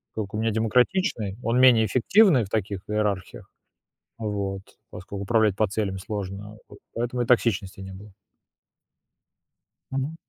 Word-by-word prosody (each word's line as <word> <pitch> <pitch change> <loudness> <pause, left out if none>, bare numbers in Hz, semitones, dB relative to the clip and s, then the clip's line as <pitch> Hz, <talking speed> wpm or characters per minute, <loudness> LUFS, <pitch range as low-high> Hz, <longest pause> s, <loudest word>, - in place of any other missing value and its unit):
Как 105 -3 -4
у - - -2
меня 110 +1 0
демократичный, 115 - +1
он 120 +2 +1
менее 120 -4 +6
эффективный 130 - +4
в 95 - -8
таких 100 -2 -2
иерархиях. 105 -3 -2 0.7
Вот. 100 -3 -3 0.3
Поскольку 100 +1 -7
управлять 110 -2 +2
по 110 +1 +2
целям 100 -1 -2
сложно, 100 +1 -6
вот - - -14
поэтому 120 +1 -2
и - - 0
токсичности 110 -6 +1
не 95 0 -8
было. 100 +2 -12 1.8
Мгм. 135 +4 -3
105 Hz, 135 wpm, -25 LUFS, 100-120 Hz, 1.8 s, менее